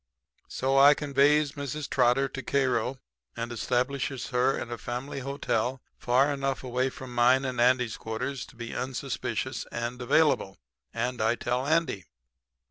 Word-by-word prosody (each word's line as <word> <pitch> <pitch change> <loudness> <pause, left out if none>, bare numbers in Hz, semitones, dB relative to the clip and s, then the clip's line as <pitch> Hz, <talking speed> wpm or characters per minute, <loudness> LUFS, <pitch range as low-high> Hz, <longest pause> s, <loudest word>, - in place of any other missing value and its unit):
"So 135 +1 +1
I 145 +1 +8
conveys 145 +1 +3
Mrs. 145 +1 -5
Trotter 125 +1 +3
to 135 0 -6
Cairo 130 -2 0 0.4
and 115 +1 -3
establishes 125 +2 -1
her 130 +1 +2
in 120 - -5
a 120 - -3
family 125 +6 -5
hotel 130 -2 -1 0.2
far 135 +4 +2
enough 135 -1 -2
away 130 +1 0
from 130 -1 -9
mine 125 +3 +4
and 125 -2 -1
Andy's 125 -2 +3
quarters 125 +4 -4
to - - -17
be 115 0 -7
unsuspicious 130 -1 -3
and 120 +1 -4
available, 125 -7 +2 0.3
and 120 +1 -2
I 110 +2 +2
tell 125 +3 -2
Andy. 150 - +1
130 Hz, 145 wpm, -28 LUFS, 120-135 Hz, 0.4 s, I